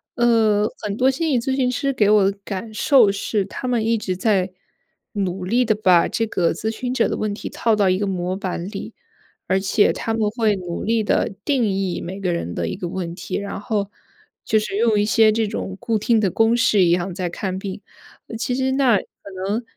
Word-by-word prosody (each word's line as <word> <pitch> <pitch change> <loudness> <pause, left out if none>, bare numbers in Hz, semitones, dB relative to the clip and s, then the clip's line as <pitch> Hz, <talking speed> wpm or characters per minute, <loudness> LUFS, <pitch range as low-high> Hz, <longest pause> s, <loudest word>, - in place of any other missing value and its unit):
呃， 225 -4 +3
很 205 -1 -3
多 255 +2 +4
心 315 +5 -1
理 260 -5 +2
咨 265 +3 -1
询 255 -2 +1
师 275 +2 -1
给 210 -5 +2
我 210 -2 +5
的 200 - -6
感 210 +2 -6
受 240 -1 +5
是， 200 0 -1
他 200 - -7
们 235 -3 +1
一 230 0 +2
直 185 -4 -3
在 190 -2 +1 0.6
努 190 -3 -2
力 240 +7 +2
地 225 -2 +2
把 185 -5 +3
这 225 - -1
个 175 -5 +1
咨 220 - -3
询 245 +3 -3
者 - - +2
的 - - -2
问 215 -1 -2
题 205 - -6
套 230 - 0
到 200 -2 +3
一 185 - +2
个 205 - -1
模 185 -1 -2
板 185 -3 -4
里， 200 -1 -7 0.5
而 190 - +2
且 195 +2 +2
他 225 - -3
们 220 -2 +1
会 220 -3 +1
努 175 -2 -5
力 225 0 +1
地 205 - 0
定 275 -4 +2
义 190 -2 -2
每 190 +3 -6
个 185 -3 -1
人 85 - -3
的 85 -1 -2
一 - - -3
个 175 - -5
问 175 -2 -4
题， - - -4
然 200 0 -5
后， 210 -4 -2 0.5
就 220 - +2
是 215 -2 -4
用 220 -1 +2
一 205 - +2
些 220 0 +4
这 220 0 0
种 190 -2 -5
固 230 -2 0
定 225 +2 +2
的 200 -3 +2
公 225 +5 +2
式 230 -6 +4
一 175 - +3
样 175 +1 0
在 180 -1 -2
看 185 +1 -4
病。 195 +1 -6 0.6
其 250 - -2
实 260 +1 0
那 260 -5 +4
可 - - -4 0.4
能 215 +4 -1
210 Hz, 245 characters per minute, -21 LUFS, 190-230 Hz, 0.6 s, 我